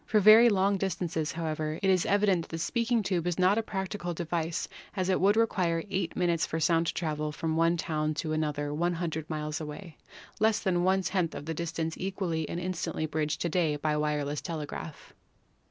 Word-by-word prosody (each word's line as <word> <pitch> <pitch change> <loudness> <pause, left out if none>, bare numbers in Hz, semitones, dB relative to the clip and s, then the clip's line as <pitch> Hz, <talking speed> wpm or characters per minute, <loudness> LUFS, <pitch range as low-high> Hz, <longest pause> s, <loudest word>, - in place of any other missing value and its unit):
For 215 - +2
very 215 +4 +8
long 200 -1 +2
distances, 170 -5 -2
however, 155 -1 -3
it - - +3
is 185 -2 +2
evident 200 -3 +3
that - - -21
the 165 - -4
speaking 230 +6 0
tube 180 -3 -1
is 175 - -1
not 190 +4 +4
a - - +1
practicable 190 -4 -4
device, 165 0 -2 0.3
as 185 -2 -1
it 185 - +2
would 200 +3 +4
re 230 - +6
quire 170 -6 -1
8 185 -4 -1
minutes 170 -2 +1
for 160 - -1
the - - -3
sound 165 +1 +3
to - - 0
travel 155 -2 -2
from 160 +1 -2
one 165 +1 +3
town 155 -1 -1
to 155 0 -2
another 150 -2 -1
100 165 -1 -2
miles 150 0 -3
away 155 +3 -8 0.2
— - - -19
less 220 0 +3
than 180 -3 +1 0.2
*/ - - -9
10 185 -3 0
of 145 - -7
the 165 - -3
distance 165 0 -3
easily 180 -5 -2
and 170 - -3
instantly 175 -3 -2
bridged 155 -1 -2
to 170 - 0
day 160 -3 +1
by 155 +1 -1
the 150 - 0
wireless 150 -1 -1
tele 160 -4 -4
graph. 150 +1 -8
170 Hz, 215 wpm, -29 LUFS, 155-185 Hz, 0.3 s, very